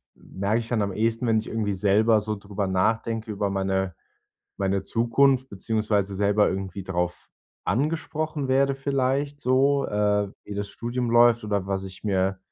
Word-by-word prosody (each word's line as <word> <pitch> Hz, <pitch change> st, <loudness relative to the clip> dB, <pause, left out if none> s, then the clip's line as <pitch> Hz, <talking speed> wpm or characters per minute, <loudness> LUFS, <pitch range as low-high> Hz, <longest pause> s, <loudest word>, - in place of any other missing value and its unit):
merke 100 Hz, +4 st, -2 dB
ich 115 Hz, -, -6 dB
dann 115 Hz, -3 st, +1 dB
am 100 Hz, -2 st, -1 dB
ehesten, 115 Hz, +2 st, 0 dB
wenn 110 Hz, -1 st, +3 dB
ich 110 Hz, -, -7 dB
irgendwie 110 Hz, -2 st, -1 dB
selber 105 Hz, +3 st, +3 dB
so 110 Hz, 0 st, -3 dB
darüber 100 Hz, -1 st, -4 dB
nachdenke, 110 Hz, +4 st, 0 dB
über 100 Hz, -1 st, -1 dB
meine 95 Hz, -2 st, -1 dB, 0.6 s
meine 95 Hz, 0 st, 0 dB
Zukunft, 130 Hz, +4 st, +2 dB
beziehungsweise 105 Hz, -1 st, -1 dB
selber 105 Hz, +1 st, +3 dB
irgendwie 95 Hz, 0 st, -4 dB
darauf 90 Hz, -1 st, -3 dB, 0.4 s
angesprochen 150 Hz, -, -1 dB
werde 135 Hz, +1 st, +3 dB
vielleicht 135 Hz, +1 st, -1 dB
so, 135 Hz, +2 st, +3 dB
äh, 105 Hz, -1 st, +1 dB
wie 105 Hz, -, -7 dB
das 100 Hz, 0 st, -3 dB
Studium 120 Hz, +2 st, -3 dB
läuft 120 Hz, -1 st, +5 dB
oder 100 Hz, -2 st, -1 dB
was 95 Hz, 0 st, -2 dB
ich 95 Hz, +2 st, -11 dB
mir 95 Hz, -1 st, +1 dB
105 Hz, 160 wpm, -25 LUFS, 100-120 Hz, 0.6 s, läuft